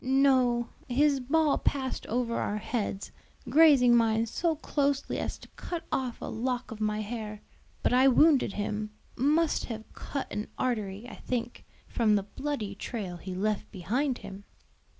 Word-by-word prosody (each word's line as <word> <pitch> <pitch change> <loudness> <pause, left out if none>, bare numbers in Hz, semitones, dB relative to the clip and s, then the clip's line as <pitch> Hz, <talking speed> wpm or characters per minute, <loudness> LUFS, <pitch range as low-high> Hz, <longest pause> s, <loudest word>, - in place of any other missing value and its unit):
"No; 255 -3 +3 0.2
his 280 +2 +3
ball 295 +4 +2
passed 265 -2 -2
over 235 0 -1
our 205 - -1
heads, 210 -2 -3 0.4
grazing 275 -5 +7
mine 225 -1 +3
so 325 +8 0
closely 285 -2 -1
as - - -3
to - - -14
cut 345 -2 -6
off 255 -3 -2
a - - -6
lock 250 +2 -3
of 220 -1 -7
my 215 0 0
hair. 215 -1 -6 0.4
But - - +2
I 260 +2 +6
wounded 270 -4 +5
him, 210 +1 -3 0.3
must 300 +5 +2
have 220 -2 -8
cut 275 - -4
an 210 - -3
artery, 215 -4 -2
I - - -9
think, 240 -1 -4 0.2
from 220 -3 +2
the 200 - +1
bloody 220 -1 -4
trail 200 -3 -5
he 185 +1 -6
left 210 +2 -1
behind 240 - -1
him." 195 +1 -9
240 Hz, 155 wpm, -29 LUFS, 215-275 Hz, 0.4 s, grazing